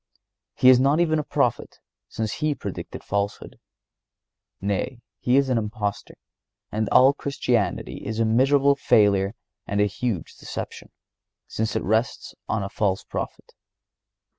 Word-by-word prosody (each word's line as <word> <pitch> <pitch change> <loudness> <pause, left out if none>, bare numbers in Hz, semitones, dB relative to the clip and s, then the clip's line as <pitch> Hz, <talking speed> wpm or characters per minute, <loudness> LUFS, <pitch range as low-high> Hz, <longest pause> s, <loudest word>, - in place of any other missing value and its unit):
He 130 - +6
is 130 -1 +7
not 140 +4 +3
even 160 -2 +2
a - - -1
prophet, - - -1 0.3
since 110 -2 -3
He 150 -1 +1
predicted - - -7
falsehood. 100 0 -3 1.0
Nay, 100 +5 -2 0.2
He 125 +2 +2
is 140 -1 +3
an 125 -3 +2
impostor, 105 -1 -4 0.6
and 110 0 -1
all 130 +2 +6
Christianity 125 -6 -1
is 110 +2 -4
a 115 - +3
miserable 135 +5 +4
failure 100 -6 +3 0.3
and 100 - -1
a 105 - +5
huge 105 -3 -3
deception, - - -7 0.6
since 110 -1 -2
it - - 0
rests 110 +5 -1 0.2
on 105 -2 0
a - - -3
false 95 -2 -1
Prophet. - - -6
110 Hz, 140 wpm, -24 LUFS, 105-130 Hz, 1.0 s, is